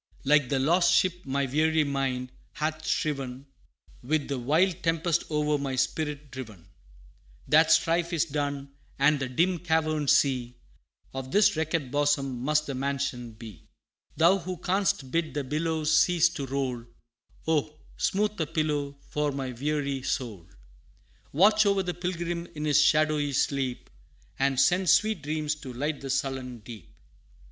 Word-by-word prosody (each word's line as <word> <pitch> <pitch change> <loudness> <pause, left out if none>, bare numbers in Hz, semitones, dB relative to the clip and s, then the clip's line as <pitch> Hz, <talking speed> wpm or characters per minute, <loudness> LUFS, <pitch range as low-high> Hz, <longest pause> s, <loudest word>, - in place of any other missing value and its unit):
Like 145 -2 +3
the 135 - +1
lost 170 +7 +3
ship 180 -4 +1
my 140 +1 0
weary 155 +4 +2
mind 135 -3 -2 0.2
hath 155 +1 -3
striven 135 -3 -2 0.6
With 145 +3 -1
the 140 -2 -2
wild 160 +8 +1
tempest 165 0 0
o'er 150 -1 0
my 135 -2 -3
spirit 145 +1 -2
driven; 110 -9 -9 0.8
That - - +5
strife 170 +1 +3
is 170 -1 +1
done 140 -2 -3 0.3
and 140 +1 +3
the 135 -1 -3
dim 170 +7 +1
caverned 155 -3 0
sea 125 -3 +2 0.6
Of 135 -1 -5
this 205 -3 +4
wrecked 160 -4 -2
bosom 140 -3 0
must 150 +2 +1
the 140 - -4
mansion 130 -3 -3
be. 110 -7 -12 0.5
Thou 175 +4 +5
who 180 +1 -5
canst 180 -7 -1
bid 165 -2 -1
the 145 - -1
billows 155 +2 0
cease 175 -1 +4
to 140 -5 -5
roll, 130 -3 -2 0.6
Oh! 155 -1 0 0.2
smooth 210 -1 0
a 155 - -1
pillow 145 -3 -2
for 150 -1 -1
my 135 -2 -4
weary 140 +1 -2
soul 120 -9 -4 0.8
Watch 210 +7 +4
o'er 200 -1 +2
the 180 -1 -3
pilgrim 175 -1 -3
in 150 0 -4
his 150 0 +4
shadowy 150 -1 +2
sleep, 135 -2 -1 0.5
And 135 -1 +1
send 180 +6 +3
sweet 210 0 +3
dreams 150 +1 -2
to 135 -3 -9
light 145 +4 -3
the 135 - -6
sullen 130 -2 -2
deep!' 110 -4 -12
145 Hz, 150 wpm, -27 LUFS, 135-160 Hz, 0.8 s, That